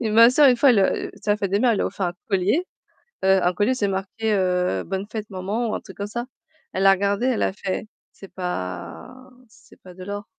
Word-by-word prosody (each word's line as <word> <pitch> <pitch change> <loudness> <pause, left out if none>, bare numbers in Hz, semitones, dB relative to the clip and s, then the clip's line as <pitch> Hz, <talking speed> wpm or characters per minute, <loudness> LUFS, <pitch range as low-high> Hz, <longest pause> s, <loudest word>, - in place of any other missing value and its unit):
et 225 - -1
ma 230 +2 +7
sœur, 285 +2 +6
une 250 - +4
fois, 270 +3 +5
elle, 235 - +4
heu, 190 - 0
c'était 210 - -4
la 205 - +3
fête 200 -3 -3
des 200 - +2
mères, 250 - +4
elle - - 0
lui - - +1
a - - 0
offert 190 - -3
un 175 - -2 0.2
collier, 205 - +1 0.6
heu, 190 -1 +4
un 180 - +2
collier, 205 +7 +1
c'est 210 -5 0
marqué, 195 +3 -2
heu, 180 - 0
«bonne 190 +2 -3
fête 215 -1 -5
maman» 200 +5 -2
ou - - -2
un - - -3
truc 190 - -14
comme 200 - -3
ça. 240 +3 -5 0.5
Elle 190 - -1
l'a 195 - +8
regardé, 200 +4 0
elle 255 -4 +1
a - - +1
fait: 195 +1 -4 0.2
«C'est 195 - -14
pas 180 - -5 0.3
c'est 215 - -21
pas 180 -1 -13
de 185 0 -10
l'or». 205 +1 -5
200 Hz, 255 wpm, -23 LUFS, 190-225 Hz, 0.6 s, l'a